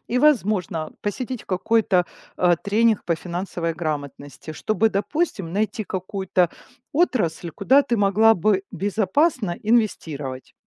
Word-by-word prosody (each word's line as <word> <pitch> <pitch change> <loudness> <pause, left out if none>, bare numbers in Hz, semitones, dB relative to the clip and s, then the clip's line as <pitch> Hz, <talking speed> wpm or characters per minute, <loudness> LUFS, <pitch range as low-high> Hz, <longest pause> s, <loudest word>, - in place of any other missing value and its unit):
и, 250 - +1
возможно, 210 - +1
посетить 245 +4 -4
какой-то, 190 -1 +2 0.3
а, 175 -2 +3
тренинг 220 +3 +1
по 170 - +1
финансовой 175 0 -4
грамотности, 145 -2 -5
чтобы, 215 +6 +1
допустим, 200 - -2
найти 210 +2 -1
какую-то 185 -2 -1 0.4
отрасль, 210 - 0
куда 255 - +4
ты 245 -4 -1
могла 215 +2 +4
бы 195 +1 +1
безопасно 205 - 0
инвестировать. 160 - -1
200 Hz, 115 wpm, -23 LUFS, 175-225 Hz, 0.4 s, куда